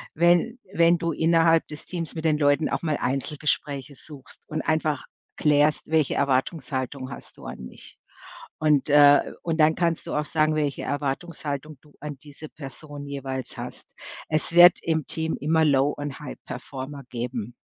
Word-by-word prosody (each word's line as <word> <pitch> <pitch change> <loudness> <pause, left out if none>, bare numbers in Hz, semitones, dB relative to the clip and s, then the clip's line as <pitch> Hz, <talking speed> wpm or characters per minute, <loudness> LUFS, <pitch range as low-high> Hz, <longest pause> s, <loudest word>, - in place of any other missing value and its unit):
wenn 175 - +3 0.2
wenn 170 +1 +4
du 170 0 -1
innerhalb 165 +1 +3
des 150 -1 -9
Teams 170 -3 -5
mit 160 0 -5
den 155 -1 +2
Leuten 145 +1 +3
auch - - -2
mal 155 -3 -1
Einzelgespräche 140 +1 -2
suchst 140 -1 -13
und 155 0 -2
einfach 155 -3 0 0.3
klärst, 150 0 +3
welche 155 -3 +1
Erwartungshaltung 130 -1 -1
hast - - -11
du - - -13
an - - -7
mich. - - -14 0.6
Und, 150 -2 +2
äh 145 0 +6
und 165 -1 -2
dann 155 0 +5
kannst 170 -2 -1
du - - -5
auch 150 0 -1
sagen, 155 0 +1
welche 145 -3 -1
Erwartungshaltung 145 0 -4
du 150 -1 -22
an 150 -3 -6
diese 150 +1 -11
Person 145 0 -9
jeweils 135 -2 -5
hast. - - -8 0.4
Es 155 +1 -1
wird 175 0 +8
im 160 -3 -1
Team 160 0 -2
immer 160 +2 +2
Low 140 -1 +3
und 145 0 -5
High-Performer 135 0 -8
geben. 120 -1 -5
150 Hz, 160 wpm, -25 LUFS, 140-160 Hz, 0.6 s, wird